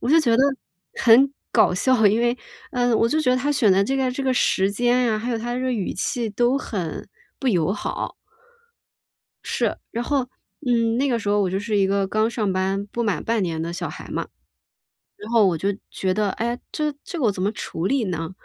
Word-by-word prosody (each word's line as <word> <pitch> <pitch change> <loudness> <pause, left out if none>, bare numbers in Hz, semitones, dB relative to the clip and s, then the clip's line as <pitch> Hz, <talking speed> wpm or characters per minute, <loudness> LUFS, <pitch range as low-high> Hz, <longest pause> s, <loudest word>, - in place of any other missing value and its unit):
我 250 - -1
就 325 - +7
觉 235 -7 +3
得 260 - +4 0.5
很 255 +4 +5 0.2
搞 - - +4
笑， 220 +3 +3
因 210 +3 +3
为， 240 +1 +1 0.4
呃， 245 -2 +2
我 230 - +3
就 310 +6 +1
觉 255 - +2
得 255 - +3
他 275 +3 0
选 220 -8 +4
的 195 +1 +4
这 270 +6 -1
个 260 -1 +1
这 275 - -4
个 265 -1 +1
时 195 -5 +2
间 245 +2 +2
啊， 215 - 0
还 235 +3 -3
有 230 - -1
他 240 +2 -3
这 - - -2
个 255 0 0
语 210 -6 -2
气 230 +3 -2
都 240 +5 +2
很 185 - -5 0.3
不 270 - -1
友 180 -5 +2
好。 205 - -4 1.3
是。 - - -1
然 235 +1 -3
后， 280 +1 +1 0.4
嗯， 230 -2 +2
那 280 - +2
个 240 -3 +1
时 205 -2 -4
候 205 0 +3
我 190 -2 +1
就 190 - -1
是 210 +1 -2
一 195 -1 +3
个 195 0 +1
刚 215 +3 +1
上 215 -5 -1
班 190 +2 -1
不 235 +3 -3
满 210 -5 -1
半 225 -3 +1
年 165 -3 -2
的 165 +1 -3
小 175 - -4
孩 - - -9
嘛。 - - -3 0.9
然 210 - -10
后 225 -3 +5
我 180 - +2
就 195 +5 -1 0.2
觉 185 -1 -1
得： 205 -1 0
“诶， 235 +2 -2
这 300 -1 -1
这 345 - -6
个 265 - +1
我 210 - +4
怎 185 -1 -4
么 205 - +1
处 175 -5 -5
理 260 +2 +1
呢？” 165 -2 -3
225 Hz, 245 characters per minute, -23 LUFS, 195-250 Hz, 1.3 s, 就